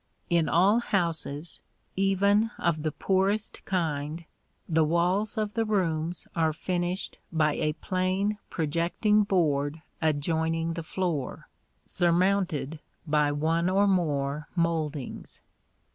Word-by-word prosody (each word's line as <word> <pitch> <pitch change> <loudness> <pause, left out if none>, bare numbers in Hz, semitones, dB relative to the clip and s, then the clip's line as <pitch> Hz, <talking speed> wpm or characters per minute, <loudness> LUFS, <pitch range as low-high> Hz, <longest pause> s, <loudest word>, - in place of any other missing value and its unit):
In 170 -2 +3
all 195 +7 +4
houses, 170 -7 -2 0.3
even 200 +3 +3
of 165 -3 0
the 155 0 -1
poorest 195 +6 0
kind, 160 -3 -2 0.4
the 160 -2 +3
walls 180 +8 +1
of 210 -1 -1
the 225 - +1
rooms 175 -5 -1
are 160 -2 +2
finished 180 +3 -2
by 155 -3 +2
a 150 +1 0
plain 185 +5 -1
projecting 170 +7 +1
board 155 -5 0 0.2
adjoining 160 +2 0
the 165 - -4
floor, 160 -5 -3 0.4
surmounted 175 -4 +1 0.3
by 150 -1 +2
one 165 +4 +1
or 195 +2 +3
more 150 -6 0
mouldings. 160 -5 -2
170 Hz, 110 wpm, -28 LUFS, 155-190 Hz, 0.4 s, all